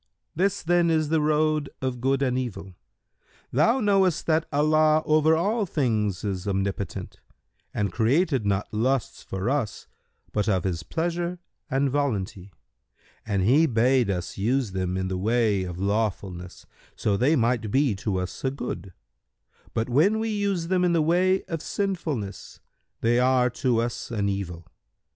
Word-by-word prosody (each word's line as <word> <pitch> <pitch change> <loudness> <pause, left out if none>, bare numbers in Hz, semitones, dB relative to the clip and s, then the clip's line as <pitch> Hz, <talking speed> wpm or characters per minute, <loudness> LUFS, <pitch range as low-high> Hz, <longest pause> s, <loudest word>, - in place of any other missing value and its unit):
This 190 +4 0
then 175 0 +3
is 155 -2 +1
the 160 -1 +2
road 155 -1 +1
of 130 -2 -3
Good 135 +1 +1
and 125 -2 +1
Evil. 120 -7 -4 0.8
Thou 160 - +3
knowest 195 - +2
that 160 0 +1
Allah 155 +1 +3
over 155 +1 +4
all 205 +4 0
things 110 - 0
is 100 -2 -3
Omnipotent 95 -1 -3 0.5
and 100 -3 -1
created 130 - +2
not 100 0 0
lusts 125 +4 0
for 95 +2 -4
us 130 -6 -1 0.5
but 105 0 0
of 95 -4 +1
His 90 -4 -2
pleasure 170 - -2 0.3
and 135 +2 +1
volunty, 100 -9 -2 0.8
and 100 -3 0
He 140 +10 +4
bade 125 -1 +2
us 90 0 -3
use 120 +2 +1
them 95 -1 -2
in 95 0 -1
the 95 0 -3
way 110 -1 +2
of 90 -1 -6
lawfulness, 95 -3 -2 0.3
so 105 - 0
they 130 +10 +3
might 115 -4 +1
be 135 +1 +2
to 100 -1 -2
us 90 0 -5
a 135 - +2
good; 100 -9 -6 0.8
but, 110 - 0
when 160 - +3
we 225 +1 -1
use 200 -5 -1
them 185 -1 +2
in 175 -1 +3
the 165 -2 +3
way 185 +4 +2
of 165 -2 -5
sinfulness 160 - -3 0.4
they 120 +1 +3
are 125 -1 +3
to 120 -2 0
us 120 0 -3
an 100 -3 -1
evil. 90 -4 -4
125 Hz, 155 wpm, -25 LUFS, 100-155 Hz, 0.8 s, over